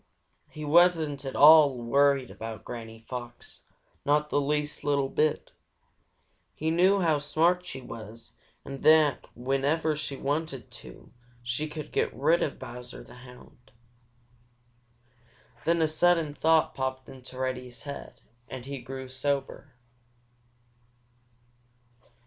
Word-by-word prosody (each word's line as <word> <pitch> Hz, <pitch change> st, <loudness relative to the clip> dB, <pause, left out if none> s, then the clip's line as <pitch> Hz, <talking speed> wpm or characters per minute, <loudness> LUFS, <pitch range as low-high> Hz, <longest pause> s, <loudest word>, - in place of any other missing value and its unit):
He 155 Hz, 0 st, -8 dB
wasn't 155 Hz, -3 st, +3 dB
at 135 Hz, -, -5 dB
all 150 Hz, -3 st, +8 dB
worried 135 Hz, +2 st, +2 dB
about 110 Hz, -1 st, -8 dB
Granny 115 Hz, -2 st, -8 dB
Fox, 120 Hz, -1 st, -8 dB, 0.4 s
not 150 Hz, +1 st, +1 dB
the 145 Hz, -, +2 dB
least 150 Hz, +1 st, -2 dB
little 140 Hz, -2 st, +1 dB
bit. 155 Hz, +1 st, 0 dB, 1.0 s
He 160 Hz, +1 st, -1 dB
knew 190 Hz, +4 st, +4 dB
how 160 Hz, -4 st, +2 dB
smart 170 Hz, +5 st, +1 dB
she 135 Hz, -6 st, -6 dB
was 115 Hz, -1 st, -10 dB, 0.3 s
and 135 Hz, -1 st, -7 dB
that 155 Hz, -2 st, +4 dB
whenever 140 Hz, +5 st, 0 dB
she 145 Hz, -2 st, -5 dB
wanted 140 Hz, -3 st, -3 dB
to, 115 Hz, -, -13 dB, 0.3 s
she 125 Hz, +6 st, -3 dB
could 155 Hz, -1 st, -7 dB
get -, -, 0 dB
rid 155 Hz, +7 st, +2 dB
of 145 Hz, -, -2 dB
Bowser 125 Hz, +1 st, -9 dB
the -, -, -15 dB
Hound. 125 Hz, -1 st, -16 dB, 1.9 s
Then 170 Hz, 0 st, +2 dB
a -, -, +3 dB
sudden 165 Hz, -1 st, +2 dB
thought 160 Hz, +1 st, +2 dB
popped 130 Hz, 0 st, -4 dB
into 130 Hz, -1 st, -11 dB
Reddy's 130 Hz, -1 st, -4 dB
head, 140 Hz, -1 st, -9 dB, 0.3 s
and 130 Hz, -2 st, -7 dB
he 140 Hz, 0 st, -6 dB
grew 130 Hz, +1 st, -8 dB
sober. 135 Hz, 0 st, -3 dB
140 Hz, 120 wpm, -28 LUFS, 130-155 Hz, 1.9 s, all